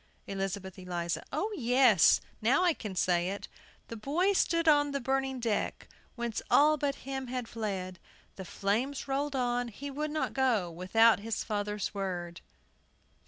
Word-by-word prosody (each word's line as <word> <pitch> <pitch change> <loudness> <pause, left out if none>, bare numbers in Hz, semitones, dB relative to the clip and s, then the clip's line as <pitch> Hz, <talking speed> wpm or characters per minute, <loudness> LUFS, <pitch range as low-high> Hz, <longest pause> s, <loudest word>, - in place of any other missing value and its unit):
ELIZABETH 195 -1 -4
ELIZA. 175 -2 -3
O 425 +3 -1
yes. 245 - +5 0.2
Now 250 +11 +3
I 350 -2 +4
can 210 -9 -7
say 175 0 +1
it. 200 +1 -5 0.4
"The 230 - -7
boy 320 - +1
stood 335 -3 +1
on 290 -2 +4
the 280 - 0
burning 265 0 -1
deck, 230 -3 -2 0.3
Whence 235 -2 -3
all 305 +2 +6
but 285 -1 -1
him 265 -1 -4
had 250 -1 -4
fled; 190 -6 -4 0.4
The 190 - -7
flames 225 +11 -2
rolled 280 +1 -1
on, 245 -1 0
he 280 +6 -7
would 300 +3 -3
not 310 +1 -2
go 235 -10 +1
Without 205 +7 +4
his 220 +1 -3
father's 210 -1 -3
word." 175 -4 -4
235 Hz, 155 wpm, -30 LUFS, 195-275 Hz, 0.4 s, all